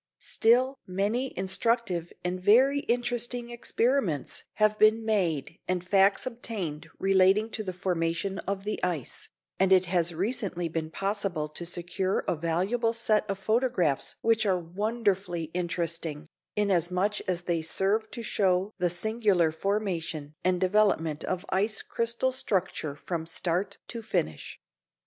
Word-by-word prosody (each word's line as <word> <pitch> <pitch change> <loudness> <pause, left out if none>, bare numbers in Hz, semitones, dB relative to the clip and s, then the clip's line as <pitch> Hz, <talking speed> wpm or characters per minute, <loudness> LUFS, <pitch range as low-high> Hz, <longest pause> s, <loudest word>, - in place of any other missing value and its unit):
Still 255 +4 +2
many 210 +8 -1
instructive 190 -2 0
and 180 +1 -2
very 255 +9 +5
interesting 240 0 -1
experiments 235 - 0
have 215 0 +2
been 220 +1 +5
made 175 -7 0
and 180 -1 -2
facts 195 +1 +4
obtained 215 -11 -4
relating 195 +3 +3
to 215 - -3
the 190 - -3
formation 180 +1 -1
of 195 0 -2
the 210 +1 -3
ice, 170 -8 -3 0.3
and 190 0 +3
it 185 -1 +6
has 175 -1 +1
recently 185 -1 -2
been 160 -1 -3
possible 195 -4 -2
to 170 +3 -6
secure 180 +2 -1
a - - +1
valuable 185 +9 0
set 215 -2 +1
of 195 - -1
photographs 215 - +1
which 225 -1 +3
are 190 -3 +2
wonderfully 185 -2 -1
interesting, 165 -3 -3 0.3
inasmuch 195 0 +1
as 175 -1 -1
they 170 -2 0
serve 200 +7 0
to 235 +2 -6
show 195 -1 +1
the 180 -1 +2
singular 190 -2 +2
formation 165 -5 -2
and 180 -1 +2
development 185 -5 +2
of 185 +1 -3
ice 210 +3 +1
crystal 235 +3 0
structure 190 - -1
from 160 +2 -4
start 175 +3 -1
to 235 - -5
finish. 80 - -3
190 Hz, 135 wpm, -28 LUFS, 170-220 Hz, 0.3 s, it